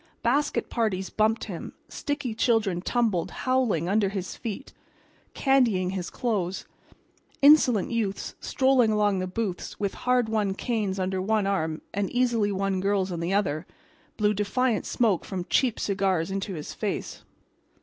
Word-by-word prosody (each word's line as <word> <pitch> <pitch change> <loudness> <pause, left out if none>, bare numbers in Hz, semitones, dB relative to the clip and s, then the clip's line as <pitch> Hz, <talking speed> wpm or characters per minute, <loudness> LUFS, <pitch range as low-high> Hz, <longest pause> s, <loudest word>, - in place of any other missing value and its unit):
Basket 280 +5 +1
parties 200 -5 -1
bumped 220 +1 +1
him; 185 -6 -6
sticky 285 -5 -3
children 220 -6 +1
tumbled, 215 -5 0 0.2
howling, 250 -11 +1
under 200 +1 +2
his 190 -2 -4
feet, 235 +3 -6 0.6
candying 235 -10 +2
his 185 -2 -4
clothes. 195 -7 -2 0.8
Insolent 265 -9 +6
youths 215 -4 -2
strolling 260 -4 +3
among 205 -2 +2
the 185 - -2
booths 185 -1 -4
with 200 -2 -1
hard 250 -2 +1
won 210 -3 0
canes 210 -5 -1
under 185 0 -1
one 215 +1 +1
arm 160 -5 -1
and 200 -1 -1
easily 235 -4 +1
won 195 -1 0
girls 195 -1 +1
on 170 - -3
the 170 +2 -2
other, 170 -5 0 0.5
blew 210 0 +2
defiant 210 +3 0
smoke 215 -8 +1
from 185 -3 -4
cheap 250 -4 +2
cigars 190 -3 0
into 195 0 -3
his 150 - -6
face. - - -4
205 Hz, 145 wpm, -26 LUFS, 190-235 Hz, 0.8 s, Insolent